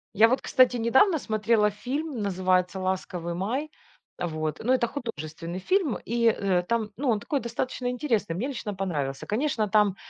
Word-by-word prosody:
Я 220 +3 +7
вот, 255 +3 +1
кстати, 255 -1 +4
недавно 265 - +4
смотрела 215 -2 +2
фильм, 260 +6 -4
называется 185 -1 +1
"Ласковый 185 -2 -2
Май". 245 - -2 0.5
Вот, 155 -3 -2
ну, 250 +3 +3
это 240 -2 +2
художественный 170 - -6
фильм 335 - +1
и, 235 0 0
э, 195 -5 +2
там, 225 +2 -1
ну, 270 +1 0
он 220 -3 +2
такой 280 +7 -1
достаточно 245 +1 -3
интересный, 235 - -1
мне 220 +9 -2
лично 220 -6 -4
понравился. 145 -8 -3
Конечно, 225 -1 0
там 205 -2 +3
215 Hz, 160 wpm, -26 LUFS, 185-250 Hz, 0.5 s, Я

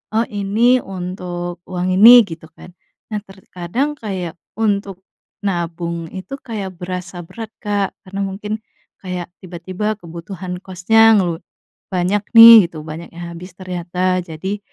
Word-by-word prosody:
Oh 230 - +3
ini 215 +5 +2
untuk 180 -2 -5
uang 180 0 -2
ini, 235 +4 +9
gitu 165 -1 -9
kan. 180 - -13 0.4
Nah 210 - -1
terkadang 195 - -4
kayak 185 -6 -4 0.3
untuk 200 -3 -1 0.4
nabung 170 -2 -3
itu 190 +9 -8
kayak 205 -5 -5
berasa 180 0 -5
berat 225 -1 -8
Kak 205 -2 0
karena 195 +1 -5
mungkin 200 +2 -4 0.5
kayak 180 -2 -4 0.2
tiba-tiba 185 +4 -4
kebutuhan 180 +2 -7
kosnya 225 +5 +4
ngelu 175 -4 +1 0.6
banyak 185 +3 +1 0.2
nih 230 0 +12 0.2
gitu 165 - -12
banyak 160 +2 -7
yang 175 - -7
habis 180 +2 -10
ternyata, 185 0 -2
jadi 190 +5 -5
185 Hz, 130 wpm, -19 LUFS, 175-205 Hz, 0.6 s, nih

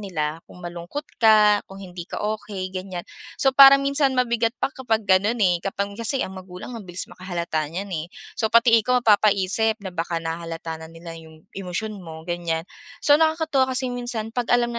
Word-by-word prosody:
nila 165 -5 -3
kung 180 -1 -13
malungkot 175 - -6 0.2
ka, 210 -2 +6
kung 195 - -11
hindi 175 -1 -9
ka - - -5
okey 205 -3 -4
ganiyan. 185 -1 -6 0.3
So 270 -1 +2
parang 275 +1 +8
minsan 275 -1 +2
mabigat 235 -1 +1
pa 275 - -2
kapag 225 -5 -1
ganon 205 +4 +3
eh, 175 -2 +2
kapag 200 +1 -3
kasi 230 +5 -2
ang 190 0 -8
magulang 185 +5 -10
ang 215 -6 -9
bilis 175 +1 0
makahalata 170 -4 -4
niyan 190 +5 -6
eh, 160 0 -3 0.3
so 220 - -1
pati 230 0 +5
ikaw 250 +2 +1
mapapaisip 210 +1 +3
na 190 - -5
baka 170 0 -3
nahahalata 165 0 -5
na 160 - -9
nila 165 0 -10
'yung 160 -1 -13
emosyon 195 +2 -4
mo 160 -2 -10
ganiyan. 170 -2 -2 0.4
So 290 -1 +6
nakakatuwa 315 -4 +2
kasi 255 -1 +2
minsan 240 -3 -3
'pag 245 -1 -2
alam 240 0 +2
na 235 - -4
200 Hz, 185 wpm, -23 LUFS, 175-235 Hz, 0.4 s, parang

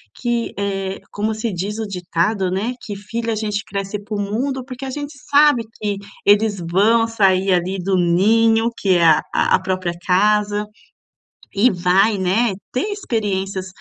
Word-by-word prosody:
que, 240 -1 -2
eh, 195 -1 -3
como 215 +1 -2
se 220 +1 -3
diz 200 +4 -3
o 220 - -3
ditado, 185 +1 -1
né, 210 +7 -2
que 205 - -6
filho 230 +3 -5
a - - -1
gente 210 -1 -2
cresce 200 +1 -4
para 210 +1 -6
o 205 - -1
mundo 255 +6 -2
porque 260 0 -7
a - - -4
gente 290 +2 -6 0.2
sabe 290 -4 +5
que 205 -2 -3 0.3
eles 205 -1 +3
vão 225 +5 +4
sair, 195 -4 +2
ali, 180 +2 0
do 190 +1 0
ninho 225 +6 +3
que 195 - 0
é 170 - +3
a 155 -2 +5
a - - +3
própria 185 -2 -2
casa. 210 +2 +2 0.9
E 230 +6 +4
vai, 190 +4 +2
né, 195 +4 +1 0.2
ter 280 +12 -1
experiências 195 - -2
205 Hz, 165 wpm, -19 LUFS, 190-225 Hz, 0.9 s, sabe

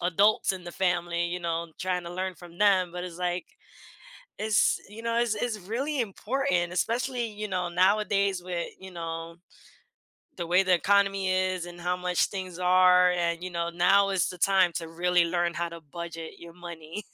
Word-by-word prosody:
adults 195 +4 +3
in 185 -1 -7
the 175 - -7
family, 175 -2 0
you 180 +1 -4
know, 165 -1 -3
trying 180 -1 -1
to 170 - -7
learn 185 0 -3
from 175 0 -14
them, 190 -4 +4
but 180 0 -5
it's 180 -1 -7
like 180 0 -1 1.0
it's, 215 -1 +2
you 225 +2 -10
know, 230 0 +1
it's 235 -3 +1
it's 215 -1 -2
really 255 +9 -2
important, 195 -5 -1
especially, 240 +4 -1
you 210 0 -6
know, 180 -2 -2
nowadays 195 +1 +2
with, 175 -2 -3
you 190 - -10
know, 165 -1 -6 1.0
the 170 -2 -4
way 180 +3 +4
the 185 -1 +3
economy 195 +1 +2
is 185 -1 0
and 175 0 -10
how 180 +1 0
much 180 -1 +1
things 185 -3 -6
are, 180 0 +5
and, 170 -1 -1
you 185 - -4
know, 170 -1 -2
now 195 +3 +4
is 190 -2 +1
the 180 - -8
time 185 -2 +4
to 165 -1 -4
really 175 +1 +2
learn 175 0 0
how 170 0 -2
to 170 0 -9
budget 170 -2 -6
your 170 0 -11
money. 170 +2 -8
180 Hz, 185 wpm, -27 LUFS, 175-195 Hz, 1.0 s, are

